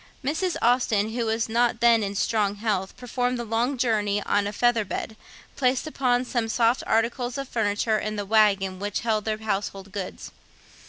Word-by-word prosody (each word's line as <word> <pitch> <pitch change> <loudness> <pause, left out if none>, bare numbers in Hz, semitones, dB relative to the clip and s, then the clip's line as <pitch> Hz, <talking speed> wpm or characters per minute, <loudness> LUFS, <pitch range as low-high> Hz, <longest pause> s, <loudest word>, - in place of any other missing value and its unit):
Mrs. 325 +6 -1
Austen, 230 -4 +2
who 235 -1 -1
was 225 +1 0
not 235 0 +1
then 235 -1 +5
in 200 -1 -3
strong 205 -1 +1
health, 205 -3 -2
performed 250 0 -2
the 235 -1 -5
short 240 +5 0
journey 210 -4 +1
on 205 0 +1
a - - -3
feather 235 +1 +2
bed, 220 +2 -5 0.4
placed 255 +1 +1
upon 255 -5 0
some 235 -2 -1
soft 235 +2 +2
articles 240 +3 0
of 275 -1 -4
furniture 215 -1 0
in 215 0 -3
the 205 -1 -3
waggon 195 -3 +2
which 205 0 -2
held 220 -3 0
their 215 -1 -1
household 200 -2 -3
goods. 195 -2 -6
225 Hz, 175 wpm, -25 LUFS, 205-245 Hz, 0.4 s, then